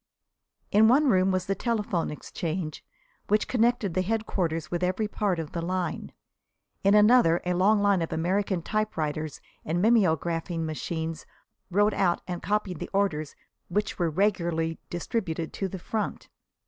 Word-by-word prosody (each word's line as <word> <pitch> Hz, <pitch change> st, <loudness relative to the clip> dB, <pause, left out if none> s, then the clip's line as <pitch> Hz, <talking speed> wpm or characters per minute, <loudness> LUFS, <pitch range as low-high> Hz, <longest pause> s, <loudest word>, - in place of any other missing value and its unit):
In 215 Hz, +2 st, +6 dB
one 275 Hz, +5 st, +5 dB
room 185 Hz, -1 st, +3 dB
was 185 Hz, -1 st, 0 dB
the 195 Hz, -, 0 dB
telephone 210 Hz, -5 st, -1 dB
exchange, 155 Hz, +1 st, -4 dB, 0.4 s
which 210 Hz, +1 st, +2 dB
connected 235 Hz, -5 st, +1 dB
the 185 Hz, -, +1 dB
headquarters 185 Hz, -6 st, -2 dB
with 175 Hz, 0 st, -1 dB
every 185 Hz, +4 st, 0 dB
part 205 Hz, -3 st, -1 dB
of 160 Hz, -2 st, -5 dB
the 170 Hz, -, -3 dB
line. 180 Hz, -1 st, -3 dB, 0.7 s
In 200 Hz, +1 st, +5 dB
another, 210 Hz, -5 st, +6 dB
a 180 Hz, -, +1 dB
long 200 Hz, +4 st, +3 dB
line 200 Hz, -3 st, +3 dB
of 165 Hz, -, -3 dB
American 185 Hz, +1 st, 0 dB
typewriters 155 Hz, -9 st, -2 dB, 0.2 s
and 165 Hz, +3 st, -1 dB
mimeographing 170 Hz, -5 st, +2 dB
machines 160 Hz, +1 st, -4 dB, 0.4 s
wrote 205 Hz, +3 st, +3 dB
out 180 Hz, -3 st, +1 dB
and 175 Hz, -1 st, -4 dB
copied 205 Hz, -5 st, -1 dB
the -, -, -5 dB
orders 160 Hz, -7 st, 0 dB, 0.3 s
which 210 Hz, +4 st, -2 dB
were 170 Hz, -2 st, +2 dB
regularly 170 Hz, -3 st, 0 dB
distributed 175 Hz, -2 st, -3 dB
to 195 Hz, -, -2 dB
the 190 Hz, -, -6 dB
front. 215 Hz, +4 st, -4 dB
185 Hz, 150 wpm, -27 LUFS, 165-210 Hz, 0.7 s, In